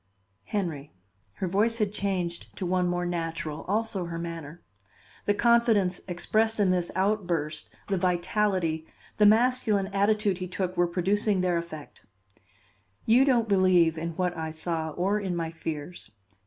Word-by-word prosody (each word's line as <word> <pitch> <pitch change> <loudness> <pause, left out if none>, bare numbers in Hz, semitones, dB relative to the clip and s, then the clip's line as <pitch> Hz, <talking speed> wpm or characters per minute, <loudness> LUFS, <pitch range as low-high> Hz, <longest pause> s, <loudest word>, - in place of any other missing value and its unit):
"Henry," 155 - -3 0.4
her 185 - -3
voice 215 +6 +1
had 210 -3 0
changed 185 -4 -3
to 190 - -3
one 180 0 +1
more 175 0 -1
natural, 165 -3 -3
also 210 -2 -1
her 170 0 -5
manner. 165 -1 -7 0.6
The 205 - +2
confidence 225 -6 +3
expressed 220 +5 0
in 195 -3 +4
this 180 -1 0
outburst, 180 -6 -1
the 195 - 0
vitality, 180 -2 0 0.3
the 210 - +6
masculine 215 -3 +3
attitude 200 -1 +2
he 185 - -4
took 185 0 -3
were 175 0 +3
producing 195 +3 +1
their 180 -1 +1
effect. 170 -3 -6 1.0
"You 245 +4 +5
don't 240 -5 +3
believe 185 -5 +4
in 165 +1 -4
what 180 -1 -1
I 160 -1 -3
saw 160 0 -3
or 190 +6 0
in 190 -3 -2
my 165 -1 -2
fears. 160 -3 -6
180 Hz, 145 wpm, -27 LUFS, 170-205 Hz, 1.0 s, the